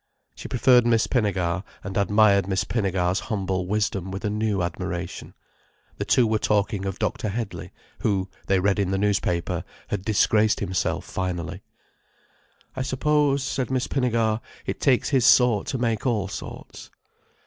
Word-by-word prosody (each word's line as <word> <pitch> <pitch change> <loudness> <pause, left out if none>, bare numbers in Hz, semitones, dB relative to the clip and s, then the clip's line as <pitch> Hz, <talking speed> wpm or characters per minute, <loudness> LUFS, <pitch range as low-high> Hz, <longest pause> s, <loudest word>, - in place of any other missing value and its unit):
She - - -9
preferred 125 0 +4
Miss 115 -1 +3
Pinnegar, 95 -6 0 0.2
and 95 0 -6
admired 100 -1 +4
Miss 95 -1 0
Pinnegar's 95 -4 0
humble 95 -4 -1
wisdom 100 -2 -1
with 95 +2 -5
a 105 - 0
new 105 -3 0
admiration. 85 0 -5 0.6
The - - -2
two 125 - +4
were 110 -1 +1
talking 105 -1 0
of 95 - -4
Dr. 105 - -2
Headley, 110 +1 -5 0.3
who, 95 -2 0 0.2
they 95 -1 +3
read 100 +2 +1
in 100 -2 +1
the 95 - 0
newspaper, 95 -4 0 0.3
had 100 -3 -2
disgraced 110 +1 +3
himself 95 -1 -1
finally. 90 -3 -4 1.1
"I 130 - -3
suppose," 140 +1 +1
said 135 -1 -2
Miss 130 -1 0
Pinnegar, 115 -4 0 0.2
"it - - -4
takes 130 -4 +3
his 135 -4 +2
sort 120 -5 +5
to 135 - -2
make 115 0 -1
all 105 -5 0
sorts." 100 - -9
105 Hz, 150 wpm, -24 LUFS, 95-115 Hz, 1.1 s, sort